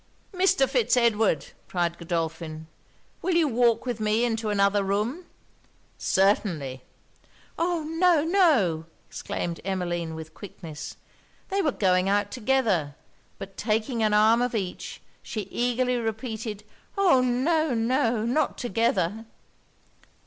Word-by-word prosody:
'Mr. 370 -6 +3
Fitz 250 -2 +2
Edward,' 220 - +2 0.2
cried 175 -2 -1
Godolphin, 165 -2 -3 0.6
'will 360 0 0
you 335 -2 +4
walk 240 -2 +2
with 245 -3 -3
me 215 +2 +2
into 225 -2 -1
another 200 0 +2
room?' 215 - -1 0.7
'Certainly.' 175 - +1 0.8
'Oh! 340 -1 0
no! 325 0 +3
no!' 290 - +3 0.2
exclaimed 170 -1 -4
Emmeline 175 -4 -2
with 160 0 -9
quickness. 165 -6 -9 0.5
They 395 +1 +1
were 310 -6 +1
going 185 -4 +2
out 205 0 +1
together; 215 - 0 0.4
but 195 0 -9
taking 225 +2 -1
an 215 -1 +3
arm 220 +3 +5
of 245 -1 -1
each, 190 -4 -4 0.2
she 220 - -4
eagerly 245 +1 0
repeated 220 -2 -4 0.3
'oh! 360 -10 +5
no! 265 +4 +1
no! 230 -1 +1
not 250 +7 0
together!' 225 -3 0
225 Hz, 120 wpm, -26 LUFS, 190-255 Hz, 0.8 s, arm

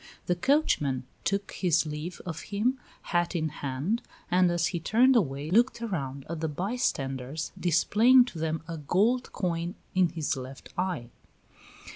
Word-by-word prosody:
The 180 - +2
coachman 170 - +2 0.2
took 200 0 -1
his 170 -4 +2
leave 155 +3 -5
of 165 -3 -4
him, 230 +6 0 0.3
hat 175 +1 +1
in 160 -2 0
hand, 145 - -2 0.3
and 180 0 +5
as 175 0 +1
he 175 - -1
turned 245 +10 +4
away 145 - 0
looked 235 +5 +3
around 140 - -4
at 170 0 -4
the 160 - -1
bystanders, 150 - -2
displaying 220 - +5
to 185 -10 -8
them 160 0 -2
a 165 -1 -5
gold 215 - +1
coin 170 -2 -2 0.2
in 185 -2 +3
his 160 -2 -2
left 130 0 -8
eye. 175 -10 -2
175 Hz, 150 wpm, -28 LUFS, 150-205 Hz, 0.3 s, and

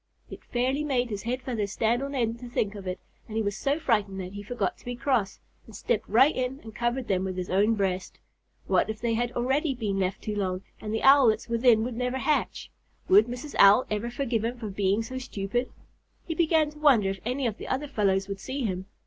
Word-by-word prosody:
It - - -9
fairly 260 +4 0
made 250 -5 0
his 200 -1 -3
head 250 +4 -3
feathers 215 -6 -3
stand 230 +3 +1
on 280 +1 -4
end 230 -2 -1
to 245 0 -9
think 210 -3 -1
of 200 -2 -8
it, 185 0 -3 0.3
and 220 - -5
he 225 - +1
was 205 -1 -2
so 280 +5 0
frightened 210 -10 0
that 185 0 -6
he 205 - -6
forgot 240 +4 -2
to - - -21
be 245 0 -4
cross, 235 -6 0 0.3
and 220 - -12
stepped 215 +2 -1
right 260 +8 +5
in 255 +1 -2
and 220 -1 -10
covered 240 +3 -1
them 190 -1 +1
with 185 -1 -4
his 180 -1 -4
own 205 +4 +3
breast. 190 -2 -2 0.5
What - - +2
if 215 0 -4
they 235 -1 0
had 240 +1 0
already 270 +4 0
been 205 -5 -2
left 190 +1 -2
too 210 - -3
long, 185 -2 -2 0.2
and 210 - -5
the 220 - -2
Owlets 255 -5 +5
within 230 -1 +4
would 240 0 -4
never 250 +2 -1
hatch? 300 +3 -1 0.4
Would 395 +2 +7
Mrs. 250 +5 -6
Owl 205 +6 +7
ever 210 +3 -1
forgive 240 -3 -1
him 240 +2 -2
for 220 -4 -6
being 200 +2 +1
so 260 +3 -5
stupid? 245 0 -3 0.6
He 330 - -3
began 315 -2 +2
to 300 - -15
wonder 240 -10 +4
if 195 - -6
any 255 +3 -2
of 225 -2 -2
the - - -7
other 275 +3 -2
fellows 195 -7 +1
would 200 -1 -5
see 265 +5 -4
him. 185 -2 -3
230 Hz, 235 wpm, -27 LUFS, 200-255 Hz, 0.6 s, Would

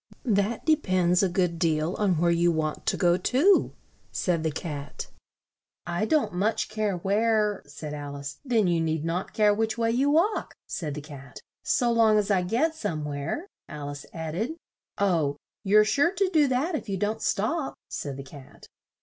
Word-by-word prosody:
"That 210 0 0
de 315 - +5
pends 185 - +2
a 195 - +2
good 175 -2 0
deal 160 +1 +1
on 195 -5 +1
where 170 +1 +3
you 170 0 +3
want 155 -2 -2
to - - +1
go 175 -2 +3
to," 280 - +3 0.4
said 175 -3 0
the 160 - 0
Cat. 145 -3 -6 0.8
"I 175 +4 -1
don't 305 - +1
much 205 +5 0
care 215 -3 -1
where 210 +2 +1
" - - -44
said 150 +1 -7
Al 145 -1 -6
ice. 140 -1 -7
"Then 235 -6 +2
you 170 -2 +2
need 160 -1 -1
not 170 +3 -2
care 210 -1 +4
which 220 +2 -1
way 230 -1 +1
you 265 +5 +2
walk," 340 +9 +1
said 150 -5 -4
the 150 - -5
Cat. 140 -3 -11 0.2
" - - -66
so 240 -1 +2
long 225 -2 +4
as 210 0 +1
I 190 -2 +3
get 240 - +1
somewhere," 155 - -3 0.2
Al 145 -1 -6
ice 145 0 -8
add 160 -2 -5
ed. 225 - -2 0.4
"Oh, 165 -8 +1 0.3
you're 210 +1 +5
sure 285 +10 +3
to 395 -2 +1
do 300 -3 +5
that 265 +7 0
if 275 -8 -4
you 195 - -1
don't 210 +3 -1
stop," 270 +9 -1
said 140 -2 -5
the 135 - -6
Cat. 135 0 -14
190 Hz, 190 wpm, -26 LUFS, 160-225 Hz, 0.8 s, de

